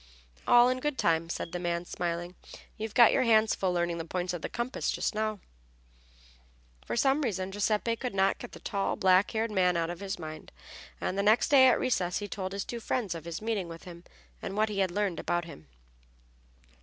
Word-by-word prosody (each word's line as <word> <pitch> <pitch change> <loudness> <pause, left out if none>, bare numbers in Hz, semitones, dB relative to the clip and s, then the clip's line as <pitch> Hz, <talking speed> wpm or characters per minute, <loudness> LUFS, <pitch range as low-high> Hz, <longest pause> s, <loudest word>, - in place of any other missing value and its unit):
"All 240 0 +7
in 255 0 0
good 295 0 -2
time," 165 0 +1
said 170 - -4
the 180 - -4
man, 175 0 -2
smiling. 175 0 -3 0.4
"You've 220 0 -6
got 235 -2 +8
your - - +2
hands 220 -2 +4
full 190 -2 0
learning 175 -1 -1
the - - -3
points 180 +2 -3
of 175 - -5
the - - -4
compass 240 +2 -3
just - - -1
now." 215 -1 -2 1.5
For - - -2
some 270 +4 +3
reason 195 -7 -2
Giuseppe 210 +3 0
could 250 -4 -4
not 195 0 +2
get 245 - -9
the - - -10
tall, 200 -2 -2
black 190 -1 +4
haired 225 0 -1
man 180 -3 +2
out 165 0 -1
of 175 - -7
his 195 -1 -4
mind, 155 -2 -8 0.5
and 195 - -2
the - - +4
next 220 +4 +3
day, 265 -2 +7
at 255 - +4
recess, 180 -9 0
he 205 - -4
told 190 -1 -4
his 200 0 -4
two 235 - -5
friends 225 -4 -2
of 165 -1 -8
his 170 +4 -6
meeting 215 -5 -1
with 165 0 -10
him 175 -1 -11 0.4
and 195 - -5
what 215 0 +2
he 205 -2 -3
had 190 -1 +2
learned 200 -1 -1
about 175 -1 -1
him. 80 - -12
195 Hz, 215 wpm, -29 LUFS, 175-225 Hz, 1.5 s, got